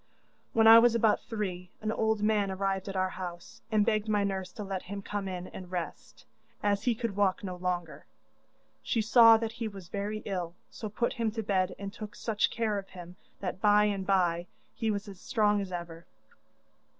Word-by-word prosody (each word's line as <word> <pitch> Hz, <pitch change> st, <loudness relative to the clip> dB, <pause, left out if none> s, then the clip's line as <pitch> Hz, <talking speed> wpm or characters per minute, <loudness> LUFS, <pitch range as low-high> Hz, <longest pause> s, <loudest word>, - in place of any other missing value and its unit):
'When 225 Hz, 0 st, +4 dB
I 225 Hz, +1 st, +11 dB
was 235 Hz, 0 st, +4 dB
about 220 Hz, -2 st, +3 dB
three 185 Hz, -5 st, -4 dB
an 215 Hz, 0 st, -2 dB
old 220 Hz, -1 st, 0 dB
man 210 Hz, -2 st, +2 dB
arrived 195 Hz, 0 st, -2 dB
at 195 Hz, -, -5 dB
our 185 Hz, 0 st, 0 dB
house, 175 Hz, -2 st, -8 dB
and 210 Hz, -1 st, +3 dB
begged 215 Hz, -1 st, +1 dB
my 210 Hz, -1 st, +2 dB
nurse 190 Hz, -2 st, -2 dB
to 210 Hz, -, -6 dB
let 195 Hz, -2 st, -3 dB
him 200 Hz, +1 st, -7 dB
come 205 Hz, -1 st, -3 dB
in 180 Hz, -1 st, -4 dB
and 185 Hz, -1 st, -9 dB
rest, 180 Hz, -2 st, -6 dB, 0.4 s
as 205 Hz, 0 st, +1 dB
he 240 Hz, -2 st, +3 dB
could 230 Hz, -3 st, -3 dB
walk 200 Hz, -1 st, +1 dB
no 185 Hz, -2 st, -4 dB
longer. 180 Hz, -3 st, -4 dB, 0.7 s
She 235 Hz, -, -1 dB
saw 230 Hz, 0 st, +8 dB
that 225 Hz, 0 st, -3 dB
he 230 Hz, 0 st, -4 dB
was 195 Hz, -4 st, -10 dB
very 210 Hz, +1 st, -3 dB
ill, 180 Hz, -4 st, -3 dB, 0.2 s
so 215 Hz, -, -6 dB
put 235 Hz, +3 st, -1 dB
him 230 Hz, -3 st, 0 dB
to 225 Hz, 0 st, -3 dB
bed 185 Hz, -2 st, 0 dB
and 200 Hz, 0 st, -6 dB
took 210 Hz, -1 st, -8 dB
such 215 Hz, -2 st, 0 dB
care 220 Hz, -3 st, -1 dB
of 195 Hz, -, -11 dB
him 180 Hz, -1 st, -10 dB, 0.3 s
that 185 Hz, -1 st, -4 dB
by 210 Hz, 0 st, +5 dB
and 200 Hz, -2 st, 0 dB
bye 175 Hz, -3 st, +2 dB, 0.3 s
he 225 Hz, -, -2 dB
was 205 Hz, 0 st, -2 dB
as 195 Hz, -3 st, -10 dB
strong 210 Hz, -1 st, +2 dB
as 190 Hz, -2 st, -6 dB
ever. 170 Hz, -1 st, -7 dB
200 Hz, 200 wpm, -30 LUFS, 185-215 Hz, 0.7 s, I